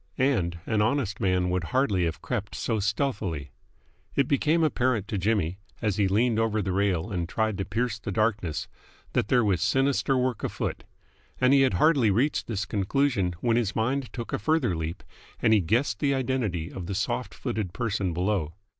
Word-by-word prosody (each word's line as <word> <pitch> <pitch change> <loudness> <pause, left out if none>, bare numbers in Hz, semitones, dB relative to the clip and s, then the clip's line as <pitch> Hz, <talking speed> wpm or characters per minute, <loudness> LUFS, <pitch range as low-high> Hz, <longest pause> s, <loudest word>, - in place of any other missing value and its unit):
And 105 -11 +1
an 110 -2 +1
honest 110 -3 0
man 90 -1 +1
would 90 -1 -1
hardly 105 -9 +1
have 80 - -4
crept 105 -5 -3
so 110 -2 -1
stealthily. 100 - -2 0.6
It 140 - +2
became 155 +4 +2
apparent 125 -8 +1
to 105 - -1
Jimmy, 95 -3 0 0.2
as 105 -4 -1
he 100 -2 +3
leaned 110 +4 +2
over 110 -1 +1
the 95 -2 -1
rail 95 0 0
and 85 -3 -2
tried 110 0 0
to 95 - -1
pierce 115 +2 -2
the 105 - -5
darkness, 105 -6 0 0.5
that - - +1
there 125 -2 +3
was 95 -5 +1
sinister 135 +6 +2
work 125 -3 -1
afoot; - - -3 0.5
and 125 +2 +4
he 140 - +6
had 130 -8 +3
hardly 135 - +4
reached 125 +9 +1
this 105 -3 -2
conclusion 100 -3 0
when 115 -1 +2
his 110 -4 0
mind 125 +3 -1
took 120 -1 -6
a - - 0
further 135 - +1
leap 80 +1 -4 0.4
and 110 - +4
he 105 - +5
guessed 105 - +1
the 140 -1 +2
identity 115 -11 -1
of 90 -3 -6
the 100 - -3
soft 100 - -2
footed 100 -4 -3
person 100 -4 -1
below. 90 -2 -1
105 Hz, 185 wpm, -27 LUFS, 95-125 Hz, 0.6 s, he